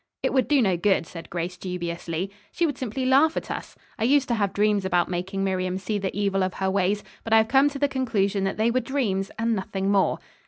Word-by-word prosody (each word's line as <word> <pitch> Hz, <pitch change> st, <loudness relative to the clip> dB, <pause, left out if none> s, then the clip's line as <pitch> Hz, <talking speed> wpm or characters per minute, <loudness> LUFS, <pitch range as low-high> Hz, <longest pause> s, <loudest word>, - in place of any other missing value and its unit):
"It -, -, +1 dB
would 260 Hz, -2 st, +2 dB
do 285 Hz, -4 st, +4 dB
no 190 Hz, -4 st, +2 dB
good," 190 Hz, -1 st, +2 dB
said 165 Hz, 0 st, -10 dB
Grace 175 Hz, +1 st, -4 dB
dubiously. 175 Hz, 0 st, -4 dB, 0.2 s
"She 345 Hz, -, +1 dB
would 290 Hz, -5 st, -2 dB
simply 255 Hz, +1 st, -3 dB
laugh 280 Hz, +5 st, +4 dB
at -, -, -4 dB
us. -, -, -6 dB, 0.2 s
I -, -, 0 dB
used 275 Hz, +3 st, +3 dB
to -, -, +2 dB
have 205 Hz, -4 st, 0 dB
dreams 210 Hz, -1 st, +2 dB
about 180 Hz, -2 st, +1 dB
making 190 Hz, +2 st, -2 dB
Miriam 185 Hz, -1 st, -1 dB
see 205 Hz, +2 st, -2 dB
the 195 Hz, 0 st, -3 dB
evil 195 Hz, -1 st, +1 dB
of 185 Hz, -, -2 dB
her 190 Hz, 0 st, 0 dB
ways, 200 Hz, +1 st, +1 dB, 0.2 s
but 225 Hz, -, -1 dB
I -, -, +8 dB
have 220 Hz, 0 st, +4 dB
come 275 Hz, +4 st, +4 dB
to 285 Hz, -, -6 dB
the 285 Hz, +1 st, +2 dB
conclusion 210 Hz, -8 st, 0 dB
that 195 Hz, -, -2 dB
they 220 Hz, +2 st, +2 dB
were 255 Hz, -, +2 dB
dreams, 225 Hz, -7 st, -1 dB
and 230 Hz, 0 st, +1 dB
nothing 195 Hz, -1 st, -2 dB
more." 195 Hz, -2 st, +2 dB
200 Hz, 240 wpm, -25 LUFS, 190-240 Hz, 0.2 s, I